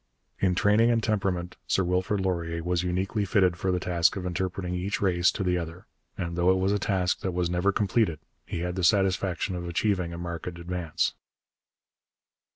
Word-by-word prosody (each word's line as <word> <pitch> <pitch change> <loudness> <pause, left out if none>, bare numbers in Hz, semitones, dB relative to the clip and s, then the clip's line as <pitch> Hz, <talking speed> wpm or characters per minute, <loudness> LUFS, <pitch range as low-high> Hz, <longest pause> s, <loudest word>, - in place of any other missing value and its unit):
In 95 -2 +2
training 105 +5 +4
and 115 -2 +2
temperament 95 -5 -1
Sir 95 - +2
Wilfrid 90 +3 0
Laurier 85 -3 -2
was 90 0 0
uniquely 95 +4 -1
fitted 95 -3 +3
for 95 +2 -1
the 90 - +1
task 85 -2 +2
of 95 -2 -4
interpreting 90 0 -2
each 95 +3 -2
race 90 -3 +3
to 100 - -2
the 90 -1 +1
other, 85 +2 -7 0.3
and 85 -1 -3
though 85 +1 +3
it 95 - +4
was 95 +1 +1
a 105 - +1
task 95 -3 0
that 95 - -3
was 90 -1 0
never 90 +3 +2
completed, 100 -4 +1 0.3
he 85 - -5
had 90 0 -2
the 95 0 -3
satisfaction 95 0 +2
of 85 0 -4
achieving 90 0 0
a 85 - -6
marked 85 0 -5
advance. 85 -1 -2
90 Hz, 185 wpm, -27 LUFS, 85-95 Hz, 0.3 s, training